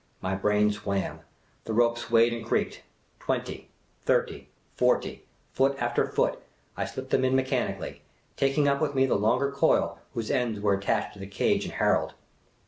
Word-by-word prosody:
My 95 Hz, 0 st, -2 dB
brain 105 Hz, +2 st, +2 dB
swam; 100 Hz, -2 st, -3 dB, 0.5 s
the 110 Hz, -, -3 dB
rope 115 Hz, 0 st, +4 dB
swayed 115 Hz, 0 st, +3 dB
and 115 Hz, -1 st, -5 dB
creaked. 115 Hz, -, -1 dB, 0.4 s
Twenty, -, -, -3 dB, 0.3 s
thirty, -, -, 0 dB, 0.2 s
forty! -, -, 0 dB, 0.3 s
Foot 135 Hz, +1 st, +2 dB
after 120 Hz, 0 st, +1 dB
foot, -, -, 0 dB, 0.3 s
I -, -, -2 dB
slipped 130 Hz, 0 st, -7 dB
them 130 Hz, -, +3 dB
in 130 Hz, 0 st, +2 dB
mechanically, 130 Hz, 0 st, -1 dB, 0.3 s
taking 135 Hz, +1 st, +2 dB
up 140 Hz, +1 st, +2 dB
with 145 Hz, -2 st, 0 dB
me 135 Hz, 0 st, +4 dB
the 135 Hz, -, +1 dB
longer 120 Hz, +7 st, +2 dB
coil 140 Hz, -, +2 dB, 0.2 s
whose 115 Hz, -2 st, -2 dB
ends 120 Hz, -4 st, 0 dB
were 100 Hz, -1 st, +2 dB
attached 100 Hz, 0 st, -1 dB
to 100 Hz, -, -14 dB
the 95 Hz, -, -7 dB
cage 100 Hz, -, +1 dB
and -, -, -7 dB
Harold. -, -, +1 dB
120 Hz, 165 wpm, -27 LUFS, 105-130 Hz, 0.5 s, rope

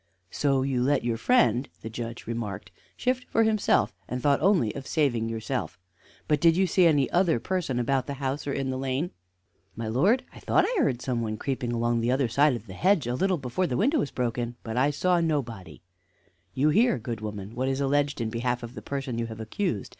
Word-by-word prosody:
"So 135 Hz, -2 st, +1 dB
you 130 Hz, -2 st, 0 dB
let 140 Hz, +2 st, +2 dB
your 120 Hz, -1 st, 0 dB
friend," 135 Hz, -, +3 dB
the 115 Hz, -, -6 dB
Judge 115 Hz, +1 st, -6 dB
remarked, 105 Hz, -6 st, -5 dB, 0.3 s
"shift 255 Hz, 0 st, 0 dB
for 225 Hz, -, +3 dB
himself, 220 Hz, -2 st, +2 dB
and 125 Hz, -, -3 dB
thought 140 Hz, +2 st, +2 dB
only 185 Hz, -, +3 dB
of 135 Hz, -1 st, -7 dB
saving 120 Hz, -8 st, +1 dB
yourself. 115 Hz, +1 st, -3 dB, 0.5 s
But 150 Hz, -2 st, +1 dB
did 165 Hz, 0 st, +5 dB
you 190 Hz, -, +4 dB
see 180 Hz, -1 st, +4 dB
any 145 Hz, -4 st, +3 dB
other 175 Hz, -7 st, +3 dB
person 175 Hz, -5 st, -2 dB
about 130 Hz, +1 st, 0 dB
the 140 Hz, -, -4 dB
house 135 Hz, +1 st, -3 dB
or -, -, 0 dB
in 135 Hz, -1 st, -2 dB
the 130 Hz, -, -3 dB
lane?" 135 Hz, +6 st, -1 dB, 0.6 s
"My 115 Hz, 0 st, -4 dB
lord, 185 Hz, -, +2 dB
I -, -, -12 dB
thought -, -, +2 dB
I -, -, -2 dB
heard 130 Hz, -, +1 dB
some 125 Hz, -3 st, -1 dB
one 110 Hz, -1 st, -3 dB
creeping 125 Hz, -1 st, -2 dB
along 120 Hz, 0 st, 0 dB
the 115 Hz, -, 0 dB
other 130 Hz, -1 st, +1 dB
side 140 Hz, +3 st, +3 dB
of 115 Hz, -, -8 dB
the 95 Hz, -, -10 dB
hedge 180 Hz, -, +2 dB
a 120 Hz, -, -1 dB
little 185 Hz, +7 st, +1 dB
before 140 Hz, +7 st, -1 dB
the 125 Hz, -, -1 dB
window 280 Hz, +8 st, +2 dB
was 145 Hz, -, -1 dB
broken, 120 Hz, -1 st, -2 dB
but 110 Hz, -1 st, -5 dB
I 130 Hz, +3 st, +3 dB
saw 175 Hz, +4 st, +1 dB
nobody." 130 Hz, -, -3 dB, 0.7 s
"You 140 Hz, +3 st, +3 dB
hear, 225 Hz, -, +3 dB
good 115 Hz, -2 st, -5 dB
woman, 105 Hz, -1 st, -6 dB
what 130 Hz, +2 st, -1 dB
is 135 Hz, 0 st, -1 dB
alleged 145 Hz, 0 st, +1 dB
in 115 Hz, -1 st, -2 dB
behalf 120 Hz, +1 st, -1 dB
of 120 Hz, +1 st, -7 dB
the -, -, -8 dB
person 135 Hz, -4 st, -4 dB
you 115 Hz, -, -2 dB
have 110 Hz, -1 st, -8 dB
accused. 110 Hz, -, -2 dB
130 Hz, 220 wpm, -27 LUFS, 115-150 Hz, 0.7 s, did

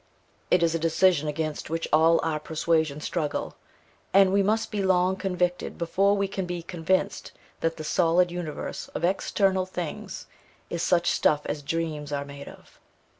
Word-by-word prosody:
It 180 Hz, -1 st, +4 dB
is 165 Hz, -1 st, +2 dB
a 165 Hz, -, 0 dB
decision 165 Hz, -1 st, +3 dB
against 155 Hz, 0 st, -3 dB
which 165 Hz, +1 st, -2 dB
all 165 Hz, +2 st, +5 dB
our 155 Hz, -1 st, -1 dB
persuasions 160 Hz, -1 st, 0 dB
struggle, 155 Hz, -4 st, -2 dB, 0.6 s
and 195 Hz, -1 st, +6 dB
we 200 Hz, -, +4 dB
must 215 Hz, +3 st, 0 dB
be 210 Hz, -2 st, -1 dB
long 185 Hz, -1 st, +3 dB
convicted 180 Hz, -2 st, -2 dB
before 195 Hz, +4 st, +2 dB
we 200 Hz, 0 st, +1 dB
can 190 Hz, -2 st, -4 dB
be 175 Hz, -1 st, -4 dB
convinced 185 Hz, +3 st, -1 dB, 0.3 s
that 165 Hz, 0 st, -1 dB
the 155 Hz, -, -6 dB
solid 175 Hz, +2 st, +2 dB
universe 175 Hz, -4 st, -5 dB
of -, -, -3 dB
external 190 Hz, 0 st, +1 dB
things 175 Hz, -4 st, -6 dB, 0.5 s
is 170 Hz, -, -2 dB
'such 175 Hz, 0 st, +2 dB
stuff 150 Hz, -1 st, +2 dB
as 145 Hz, -, -3 dB
dreams 150 Hz, -1 st, -3 dB
are 140 Hz, 0 st, -2 dB
made 140 Hz, 0 st, -10 dB
of.' -, -, -17 dB
170 Hz, 165 wpm, -26 LUFS, 155-185 Hz, 0.6 s, and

